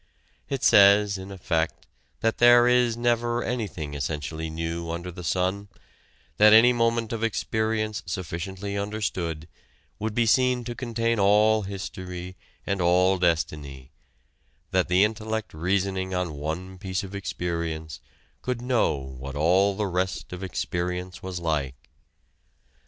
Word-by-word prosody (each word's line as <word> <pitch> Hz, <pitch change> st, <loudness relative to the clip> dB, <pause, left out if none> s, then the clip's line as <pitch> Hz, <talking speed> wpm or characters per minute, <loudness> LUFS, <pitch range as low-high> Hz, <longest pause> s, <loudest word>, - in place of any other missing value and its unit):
It 135 Hz, -2 st, -3 dB
says 100 Hz, 0 st, +6 dB
in 95 Hz, +1 st, -8 dB
effect 85 Hz, -4 st, -2 dB, 0.4 s
that 115 Hz, 0 st, 0 dB
there 120 Hz, 0 st, +7 dB
is 125 Hz, -2 st, +3 dB
never 120 Hz, 0 st, +1 dB
anything 100 Hz, -11 st, -4 dB
essentially 75 Hz, +3 st, -4 dB
new 85 Hz, +1 st, -4 dB
under 85 Hz, +2 st, -4 dB
the 90 Hz, +1 st, -9 dB
sun, 95 Hz, +5 st, -1 dB, 0.7 s
that 105 Hz, 0 st, +7 dB
any 120 Hz, +3 st, +7 dB
moment 115 Hz, -1 st, 0 dB
of 115 Hz, 0 st, -3 dB
experience 110 Hz, -1 st, -1 dB
sufficiently 95 Hz, +3 st, -4 dB
understood 100 Hz, -6 st, -3 dB, 0.5 s
would 110 Hz, 0 st, -3 dB
be 120 Hz, -, +3 dB
seen 125 Hz, +1 st, +3 dB
to 120 Hz, +1 st, -5 dB
contain 115 Hz, -2 st, -1 dB
all 105 Hz, +2 st, +4 dB
history 95 Hz, -2 st, -6 dB, 0.3 s
and 100 Hz, -1 st, -1 dB
all 90 Hz, +2 st, +3 dB
destiny 75 Hz, -6 st, -1 dB, 0.8 s
that -, -, +2 dB
the 90 Hz, +2 st, +4 dB
intellect 110 Hz, 0 st, -2 dB
reasoning 95 Hz, +3 st, -1 dB
on 90 Hz, -3 st, -2 dB
one 85 Hz, +6 st, -5 dB
piece 95 Hz, 0 st, -3 dB
of 95 Hz, 0 st, -9 dB
experience 85 Hz, -5 st, -4 dB, 0.4 s
could 125 Hz, -1 st, -2 dB
know 120 Hz, -, +1 dB
what 65 Hz, 0 st, -8 dB
all 95 Hz, +6 st, +3 dB
the 105 Hz, +1 st, -1 dB
rest 90 Hz, -1 st, -2 dB
of 90 Hz, -, -7 dB
experience 90 Hz, 0 st, -3 dB
was 95 Hz, -1 st, -5 dB
like. 75 Hz, -5 st, -1 dB
95 Hz, 130 wpm, -26 LUFS, 85-110 Hz, 0.8 s, there